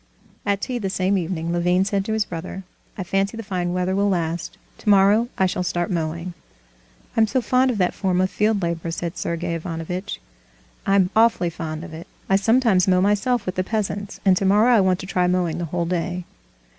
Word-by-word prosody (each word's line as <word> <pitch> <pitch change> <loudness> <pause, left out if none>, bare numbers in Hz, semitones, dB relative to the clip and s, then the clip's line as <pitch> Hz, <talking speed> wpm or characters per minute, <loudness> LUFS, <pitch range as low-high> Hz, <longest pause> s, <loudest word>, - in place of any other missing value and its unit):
At 200 0 +1
tea 250 -2 -2
the 195 -4 -2
same 190 +1 +1
evening 170 -2 -2
Levin 180 +2 +2
said 200 -1 0
to 220 - -2
his 220 -1 +1
brother: 180 +2 -6 0.3
"I 190 - -3
fancy 195 +4 -1
the 225 - -5
fine 180 -4 -2
weather 180 +1 0
will 200 +1 +2
last. 170 -2 -2 0.2
Tomorrow 205 +3 +4
I 190 - +3
shall 180 0 -1
start 175 -1 -1
mowing." 170 +1 -3 0.8
"I'm 225 -1 +4
so 235 +5 +1
fond 255 +2 +2
of 240 - -1
that 180 -2 +1
form 185 -2 0
of 185 0 +1
field 210 -2 +1
labor," 170 -1 -2
said 170 +1 -4
Sergey 170 0 -3
Ivanovitch. 170 +4 -4 0.7
"I'm 195 -1 +3
awfully 220 -6 +3
fond 160 -1 -5
of 180 -3 -9
it. 160 +2 -9 0.2
I 195 - +3
sometimes 220 -2 +3
mow 185 -1 +4
myself 210 +5 +1
with 185 - -2
the 185 - -1
peasants, 205 0 -3
and 190 -1 +6
tomorrow 205 +6 +4
I 225 - +5
want 185 -1 +2
to - - -7
try 180 -1 +1
mowing 180 -2 0
the 175 - -2
whole 170 +1 -2
day." 180 +1 -2
185 Hz, 200 wpm, -22 LUFS, 175-205 Hz, 0.8 s, and